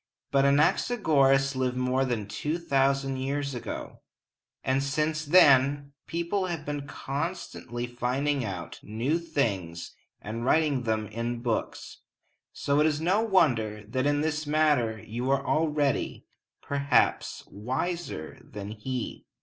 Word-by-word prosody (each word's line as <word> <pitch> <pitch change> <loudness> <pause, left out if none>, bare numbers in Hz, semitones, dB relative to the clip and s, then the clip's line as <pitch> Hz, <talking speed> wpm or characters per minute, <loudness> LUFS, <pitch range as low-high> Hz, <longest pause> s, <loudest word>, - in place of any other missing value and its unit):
But 140 0 +4
Anaxagoras 140 - +3
lived 130 -1 0
more 125 +1 +1
than 120 -5 -2
two 150 +10 -2
thousand 135 -4 +1
years 140 +1 -2
ago, 120 - -6 0.6
and 130 +1 +1
since 150 +3 0
then 145 -3 +5
people 170 +3 -1
have 165 -4 -4 0.2
constantly 140 -5 -4
been 120 0 -14
finding 135 +3 0
out 90 -6 -6
new 120 +10 -1
things 95 - -2 0.3
and 110 +3 -5
writing 140 -2 +2
them 110 -1 0
in 115 +2 -4
books, 115 -3 -3 0.5
so 140 +1 0
it 155 - +5
is 150 -1 0
no 185 +7 +2
wonder 120 - +2
that 130 +4 0
in 145 0 +2
this 155 -1 -1
matter 145 -7 +2
you 120 +4 -3
are 135 0 +1
already, 150 -3 0 0.4
perhaps, 140 0 +1
wiser 130 - -4
than 105 0 -8
he. 120 +3 -5
135 Hz, 125 wpm, -28 LUFS, 120-150 Hz, 0.6 s, then